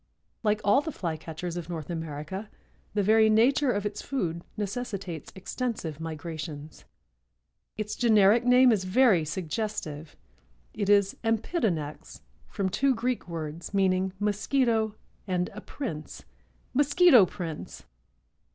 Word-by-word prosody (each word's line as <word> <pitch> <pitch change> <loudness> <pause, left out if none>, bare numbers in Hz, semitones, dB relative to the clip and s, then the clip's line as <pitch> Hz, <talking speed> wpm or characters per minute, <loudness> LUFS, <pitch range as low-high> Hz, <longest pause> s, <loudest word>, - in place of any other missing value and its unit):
Like 215 -1 +1
all 205 +7 +4
the 315 +1 -4
Flycatchers 165 - -5
of 175 -1 -6
North 165 -1 -5
America, 165 +5 -5 0.5
the 205 - +2
very 220 +2 +5
nature 250 +5 +4
of 205 -2 -2
its 210 0 -3
food 170 -11 -2 0.2
necessitates 200 - -4
extensive 190 - -4
migrations. 155 -2 -7 0.9
Its 215 0 -3
generic 220 -1 +5
name 250 0 +6
is 205 -4 +1
very 190 -2 +4
suggestive. 160 -2 -4 0.6
It 205 -2 -2
is 200 -1 +4
Empidonax, 220 - -2 0.3
from 195 -2 -2
two 260 +8 +2
Greek 245 -1 -2
words, 165 +2 -6
meaning 190 -1 +2
mosquito 220 +1 +1 0.3
and 180 -1 -1
a 210 - -8
prince—Mosquito 270 - +1
Prince! 165 -4 -7
200 Hz, 115 wpm, -28 LUFS, 165-225 Hz, 0.9 s, name